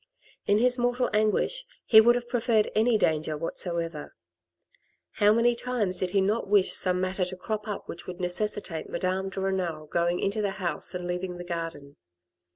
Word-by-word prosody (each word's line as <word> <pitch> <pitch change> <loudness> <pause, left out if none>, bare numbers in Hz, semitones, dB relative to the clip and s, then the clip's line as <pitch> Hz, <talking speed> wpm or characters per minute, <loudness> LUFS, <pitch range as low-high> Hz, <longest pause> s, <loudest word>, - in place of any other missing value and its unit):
In 205 - +4
his 250 +2 +3
mortal 245 +1 +1
anguish, 215 - +1 0.2
he 220 -1 +8
would 240 +2 +5
have 240 0 -3
preferred 230 -3 +1
any 220 +1 +3
danger 155 -4 0
whatsoever. 165 -1 -4 1.1
How 205 0 +7
many 230 +2 +4
times 235 -6 -2
did 185 - 0
he 195 +2 +2
not 210 +4 0
wish 200 -1 +3
some 180 -1 +1
matter 185 +1 -1
to 180 +1 -3
crop 210 +3 -4
up 210 - -5
which 170 - -9
would 180 0 -7
necessitate 180 -2 -3
Madame 190 +1 -1
de 195 - -6
Renal 180 -5 -2
going 170 +3 0
into 200 +2 -1
the 200 -1 -2
house 175 -1 -2
and 180 0 -4
leaving 180 0 -3
the 175 - -6
garden 165 -5 -6
190 Hz, 175 wpm, -27 LUFS, 175-215 Hz, 1.1 s, he